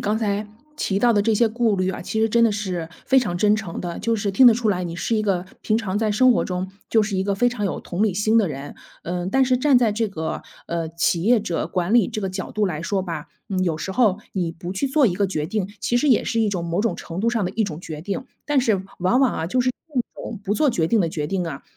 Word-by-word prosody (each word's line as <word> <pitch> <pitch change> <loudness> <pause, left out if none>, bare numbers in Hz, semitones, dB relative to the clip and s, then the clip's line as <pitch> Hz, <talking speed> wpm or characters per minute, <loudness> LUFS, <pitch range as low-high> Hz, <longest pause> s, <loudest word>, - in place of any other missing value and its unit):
刚 210 +1 0
才 210 -1 -1 0.3
提 195 -8 0
到 240 +2 +4
的 205 - +3
这 220 +1 +2
些 235 +2 +4
顾 225 -2 +1
虑 185 0 +1
啊， - - -6
其 220 - -3
实 225 - +3
真 235 +1 +4
的 230 - +5
是 185 -6 -3 0.2
非 265 - +4
常 180 -8 -1
真 210 +3 +4
诚 215 -6 -4
的。 175 -1 -5
就 230 0 0
是 205 -1 -1
听 250 +6 +6
得 230 - +8
出 230 -2 +1
来， 180 -2 -1
你 170 0 -5
是 225 - -1
一 215 - +2
个 185 -4 0 0.2
平 215 - +1
常 205 -3 -2
在 220 -1 +1
生 255 +5 +5
活 - - +1
中， 185 +1 -3 0.2
就 220 -2 +4
是 205 -1 -2
一 190 - +1
个 200 0 0
非 245 +4 +3
常 210 -5 -2
有 - - -3
同 180 +4 -3
理 205 -5 +2
心 215 +3 +3
的 205 -6 +2
人。 140 -1 -7 0.3
嗯， 175 +1 -3
但 265 +6 +3
是 255 -1 +2
站 280 0 +4
在 235 -4 +3
这 220 0 0
个， 160 -4 -4 0.2
呃， 170 -1 -2
企 170 +1 0
业 240 +2 +5
者 175 -5 -2
管 180 +3 -1
理 235 -6 +5
这 215 - -4
个 190 - -2
角 190 0 -5
度 210 -1 0
来 160 -5 -2
说 190 +2 -1
吧， 165 -5 -5 0.2
嗯， 185 -1 0
有 165 -3 0
时 190 +5 -4
候 215 -3 +3
你 175 -4 -1
不 175 +2 -7
去 195 +8 -1
做 275 -1 +4
一 185 - +1
个 200 +1 +1
决 155 -6 -2
定， 200 0 -2
其 240 +3 +1
实 295 - +1
也 240 - +4
是 230 - 0
一 215 - +2
种 180 -4 -2
某 170 +3 -1
种 230 - 0
程 170 +2 -6
度 230 - +1
上 230 -4 0
的 180 - -1
一 220 +2 0
种 160 -5 -5
决 155 -4 -6
定。 200 +9 -4 0.2
但 295 -2 +2
是 210 -6 +1 0.2
往 185 +9 +3
往 265 -3 +4
啊， 160 - -2
就 250 +8 +1
是 255 - +1
这 255 -1 -5
种 220 -4 -6
不 205 +1 -1
做 300 +1 +3
决 160 -8 0
定 225 +5 +2
的 165 -3 0
决 150 -2 -3
定 180 +1 -2
啊， 140 -3 -6
205 Hz, 310 characters per minute, -22 LUFS, 180-230 Hz, 0.3 s, 得